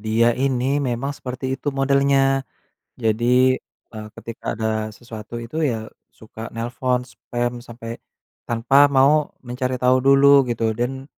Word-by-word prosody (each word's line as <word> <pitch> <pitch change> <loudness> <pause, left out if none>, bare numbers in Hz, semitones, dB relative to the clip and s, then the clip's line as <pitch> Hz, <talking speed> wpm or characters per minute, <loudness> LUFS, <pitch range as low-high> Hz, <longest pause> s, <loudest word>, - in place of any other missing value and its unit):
dia 110 +2 +2
ini 135 +2 0
memang 125 +4 -2
seperti 130 -1 -5
itu 135 +2 -4
modelnya. 135 0 +2 0.6
Jadi, 125 +3 +2 0.3
eee, 110 -1 -7
ketika 115 -1 -6
ada 110 -1 -1
sesuatu 115 -1 -9
itu 120 +7 -5
ya, 115 -8 -2 0.2
suka 110 +1 -10
nelpon, 125 +2 -1
spam 120 -1 -4
sampe 115 -1 -9 0.5
tanpa 135 +5 +4
mau 140 +2 +4 0.2
mencari 125 +1 -3
tahu 125 +1 +3
dulu 140 0 +5
gitu. 115 -1 0
Dan 125 +4 -3
125 Hz, 130 wpm, -21 LUFS, 115-135 Hz, 0.6 s, dulu